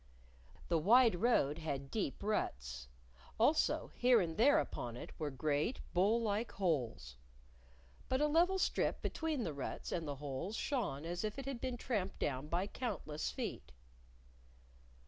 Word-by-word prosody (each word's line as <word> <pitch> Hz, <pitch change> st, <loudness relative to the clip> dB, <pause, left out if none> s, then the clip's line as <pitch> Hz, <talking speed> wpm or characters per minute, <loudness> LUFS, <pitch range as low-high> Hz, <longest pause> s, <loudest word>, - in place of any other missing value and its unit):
The 165 Hz, -, +2 dB
wide 230 Hz, +7 st, +6 dB
road 170 Hz, -, +2 dB
had 140 Hz, -4 st, -4 dB
deep 215 Hz, -2 st, -2 dB
ruts. 60 Hz, -, -2 dB, 0.5 s
Also, 290 Hz, +8 st, +3 dB
here 245 Hz, -1 st, +5 dB
and 165 Hz, -4 st, -1 dB
there 275 Hz, +6 st, +5 dB
upon 120 Hz, -1 st, -2 dB
it -, -, -8 dB
were 155 Hz, -2 st, -1 dB
great, 145 Hz, -, 0 dB
bowl 200 Hz, +6 st, +4 dB
like 220 Hz, 0 st, -1 dB
holes. 125 Hz, -, -1 dB, 0.9 s
But 260 Hz, -, +2 dB
a 300 Hz, -, +4 dB
level 340 Hz, +5 st, +3 dB
strip -, -, 0 dB
between 315 Hz, -6 st, -1 dB
the 160 Hz, -, -2 dB
ruts 140 Hz, -2 st, -5 dB
and 165 Hz, -3 st, -2 dB
the 145 Hz, -, -3 dB
holes 145 Hz, +8 st, -4 dB
shone 205 Hz, -, -2 dB
as 175 Hz, +3 st, -3 dB
if 215 Hz, +2 st, -3 dB
it 275 Hz, -, -5 dB
had 270 Hz, -3 st, -4 dB
been 255 Hz, -2 st, -2 dB
tramped 210 Hz, -6 st, -2 dB
down 135 Hz, 0 st, -2 dB
by 175 Hz, +4 st, 0 dB
countless 200 Hz, -10 st, -3 dB
feet. 65 Hz, +1 st, -5 dB
185 Hz, 150 wpm, -36 LUFS, 145-240 Hz, 0.9 s, wide